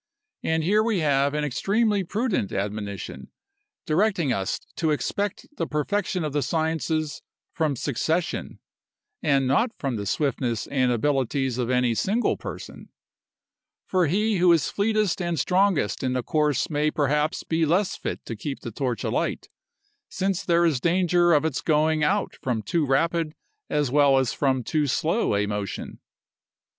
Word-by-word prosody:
And 160 0 0
here 205 +6 +3
we 220 -5 +1
have 140 -1 +2
an 150 - 0
extremely 200 - +1
prudent 205 - -1
admonition, 100 0 -4 0.6
directing 170 - +1
us 95 -1 -2 0.2
to 160 - +1
expect 200 +6 -2
the 165 - -1
perfection 180 +5 -1
of 150 -2 -3
the 145 - +1
sciences 160 +1 -1 0.3
from 155 -4 0
succession, 155 +7 -2 0.6
and 140 -3 +2
not 180 - +3
from 135 -5 -2
the 100 -1 -4
swiftness 125 -3 -1
and 130 -3 +1
abilities 130 0 0
of 120 -1 -1
any 125 -2 +2
single 210 - +1
person; - - -9 1.0
for 185 -3 +2
he 210 +6 +1
who 180 0 +5
is 165 -3 +2
fleetest 210 -2 +1
and 170 -3 -1
strongest 185 - +2
in 130 -1 0
the 125 -1 -1
course 150 -3 +1
may 150 0 +1
perhaps 150 +1 0
be 165 0 0
less 180 +5 +2
fit - - -5
to - - -5
keep - - -6
his - - -6
torch - - -2
alight, - - -2 0.6
since 195 0 -1
there 170 -1 +3
is 155 -6 +2
danger 175 +1 +3
of 150 -1 +4
its 160 -4 -1
going 155 0 +2
out 200 +6 +1
from 120 -4 -1
too 155 - 0
rapid 165 +3 +1 0.3
as 145 -4 0
well 140 -1 +5
as 130 -2 +1
from 130 -3 +1
too 150 +3 0
slow 160 - +1
a 100 +1 +1
motion. 105 -2 -5
155 Hz, 155 wpm, -25 LUFS, 135-175 Hz, 1.0 s, who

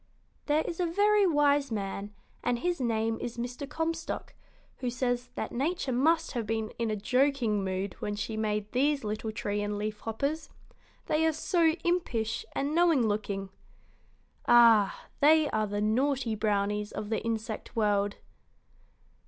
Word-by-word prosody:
"There 305 +1 +3
is 340 - -5
a 355 - +1
very 410 +3 +4
wise 290 -4 +3
man, 200 -1 -3 0.3
and 245 -1 +1
his 345 +4 -1
name 225 -1 0
is 240 0 -5
Mr. 245 +3 -5
Comstock, 325 +1 -3 0.4
who 250 - -2
says 245 0 -1
that - - -3
Nature 290 +3 -1
must 320 +7 +2
have 230 -3 -3
been 220 0 -2
in 230 -1 0
a 215 - 0
joking 245 -1 +1
mood 190 0 -2
when 205 - -3
she 215 +1 -4
made 210 -1 -2
these 280 +2 +1
little 215 +1 -3
tree 205 -1 -2
and 205 0 -2
leaf 210 0 -3
hoppers, 280 +8 -3 0.6
they 310 +1 +1
are - - +3
so 325 +1 +2
impish 240 -11 -1
and 280 +2 -1
knowing 330 -8 +4
looking. 200 -2 -2 1.0
Ah, 230 -4 +6
they 310 +1 +5
are 215 -1 0
the 205 0 -2
naughty 250 +2 +1
brownies 210 -1 0
of 210 - -5
the 220 - 0
insect 225 -1 -4
world!" 205 -2 +1
235 Hz, 155 wpm, -29 LUFS, 210-290 Hz, 1.0 s, Ah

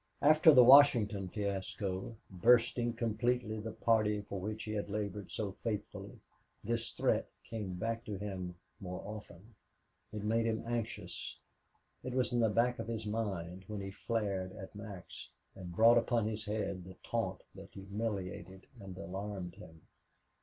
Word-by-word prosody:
After 155 +2 +8
the 125 -4 +9
Washington 120 -7 +7
fiasco, 100 +1 -3 0.2
bursting 120 +4 +4
completely 115 0 0
the 110 +1 -5
party 110 -2 +2
for 100 -1 -5
which 105 +3 -4
he 105 - -5
had 105 -1 -2
labored 105 0 -3
so 105 -3 -2
faithfully, 105 -3 -4 0.4
this 115 +1 -1
threat - - +1
came 105 -5 -5
back 115 +4 -2
to 105 -2 -4
him 95 -3 -5 0.2
more 90 -1 -6
often. 105 0 -9 0.6
It 105 -1 -5
made 115 +2 +2
him 110 -1 -1
anxious. 115 -1 -3 0.7
It 130 0 -4
was 125 -1 +1
in 120 - +2
the 115 -1 +4
back 120 +3 +2
of 115 - -4
his 110 -1 -3
mind 95 -4 -3
when 105 -1 -4
he 95 0 -5
flared 100 -3 -2
at 95 -2 -9
Max 100 -4 -9 0.3
and 90 -2 -8
brought 115 +3 +7
upon 115 -2 +1
his 110 0 -3
head 105 -3 -2
the 95 +1 -11
taunt 95 -6 -2
that 95 0 -11
humiliated 95 -2 -4
and 95 -3 -9
alarmed 95 -1 -5
him. 80 0 -13
105 Hz, 155 wpm, -34 LUFS, 95-115 Hz, 0.7 s, the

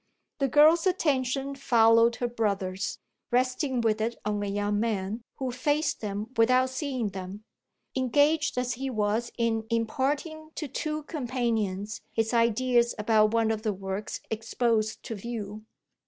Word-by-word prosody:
The 275 - +2
girl's 310 +6 +5
attention 275 -6 0
followed 230 -3 +4
her 245 - -1
brother's, 200 -5 -2 0.3
resting 255 +1 +1
with 220 -1 +1
it 230 +2 -1
on 210 -1 -1
a 205 - -2
young 205 +1 0
man 215 0 -1
who 260 -2 -3
faced 290 +5 0
them 210 +2 -4
without 255 +3 +4
seeing 260 -5 -2
them, 190 +2 -7 0.5
engaged 285 +3 +2
as 250 0 0
he 265 +2 -4
was 220 0 0
in 225 -2 0
imparting 285 +7 -1
to 305 - -4
two 305 +3 -3
companions 230 - -2
his 225 +1 0
ideas 235 +1 +3
about 215 0 +3
one 225 -1 +3
of 220 -1 -2
the 215 -2 -1
works 195 +2 -5
exposed 225 0 0
to - - -5
view. 215 -1 -6
230 Hz, 140 wpm, -28 LUFS, 215-260 Hz, 0.5 s, girl's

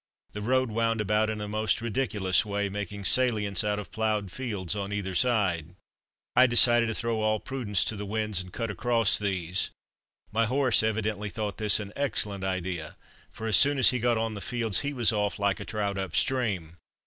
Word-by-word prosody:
The 105 - -6
road 130 +2 +1
wound 115 0 0
about 105 +1 +1
in 110 0 -3
a 105 - -4
most 110 +1 0
ridiculous 110 -6 0
way, 100 -1 -2
making 100 0 -5
salients 105 -5 +2
out 105 -1 0
of 105 -3 -7
ploughed 110 -3 -1
fields 105 -7 -3
on 100 -1 -4
either 100 -2 -3
side. 90 -7 +1 0.6
I 130 +1 +7
decided 120 -1 +5
to 110 - -2
throw 115 -2 -1
all 110 0 +1
prudence 115 -7 -1
to 110 - -1
the 105 - -5
winds, 105 -2 -1
and 90 0 -10
cut 115 +1 -3
across 115 -1 +2
these. 95 -3 -2 0.6
My 115 +1 +2
horse 130 0 +2
evidently 110 -1 -1
thought 105 0 -4
this 105 -1 +4
an 105 -1 -7
excellent 105 -8 -2
idea, 95 -4 -3 0.3
for 110 - -8
as 110 -4 +4
soon 140 +3 +4
as 130 - +6
he 125 - -1
got 120 0 +2
on 115 0 -1
the 100 - -7
fields 115 -3 0
he 145 - -2
was 120 -5 +1
off 105 -1 -1
like 100 -1 0
a - - -6
trout 100 -2 -2
up 95 -1 -4
stream. 100 -11 0
105 Hz, 195 wpm, -28 LUFS, 100-115 Hz, 0.6 s, I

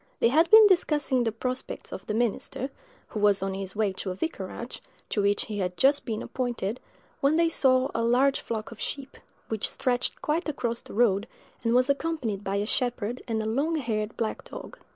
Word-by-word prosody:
They 230 - +4
had 320 +6 +4
been 440 0 +10
discussing 300 -9 +3
the 225 - 0
prospects 255 +3 -3
of 190 - -8
the 210 - -1
minister, 240 +3 -1 0.4
who 215 - -4
was 205 -2 +3
on 195 0 -1
his 195 0 -5
way 205 -2 +1
to 190 - -5
a 185 - -3
vicarage, 320 - -5 0.3
to 210 - +1
which 200 0 +2
he 210 -2 -4
had 180 -1 -2
just 280 +6 +3
been 220 -2 -3
appointed, 240 -3 -3 0.4
when 280 +3 +3
they 335 0 +4
saw 260 -4 +3
a 230 - 0
large 255 +4 +3
flock 220 -1 -4
of 230 - -11
sheep, 275 -1 -5 0.3
which 220 -2 -1
stretched 245 -1 -1
quite 315 +2 -1
across 235 -5 -2
the - - -11
road, 215 -2 +3 0.4
and 230 0 +2
was 255 +1 +4
accompanied 280 -8 -1
by 195 0 -2
a 200 +1 0
shepherd 245 0 -1
and 220 -2 -1
a - - -4
long 280 +9 0
haired 220 -7 -2
black 225 -2 -2
dog. - - -10
235 Hz, 200 wpm, -27 LUFS, 210-275 Hz, 0.4 s, been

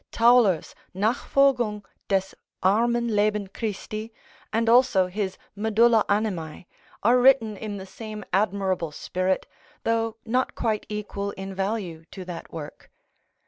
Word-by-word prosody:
Tauler's 230 -6 +4 0.2
"Nachfolgung 230 0 +2 0.2
des 195 -1 0 0.3
armen 235 +5 +3
Leben 210 0 +2
Christi," 215 +2 -5 0.4
and 225 +1 +1
also 230 -5 +5
his 190 +1 -3 0.2
"Medulla 220 +2 +4
Animæ," 185 -7 -1 0.4
are 240 +4 +5
written 245 -4 +5
in 205 0 -5
the 190 - -7
same 215 +2 -8
admirable 190 -4 0
spirit, 185 +5 -1 0.4
though 225 0 0
not 250 +3 0
quite 220 -3 -1
equal 205 -1 -4
in 195 0 -7
value 190 -4 -3
to 190 -2 -8
that 175 -2 -8
work. 155 -3 -9
210 Hz, 120 wpm, -25 LUFS, 190-225 Hz, 0.4 s, also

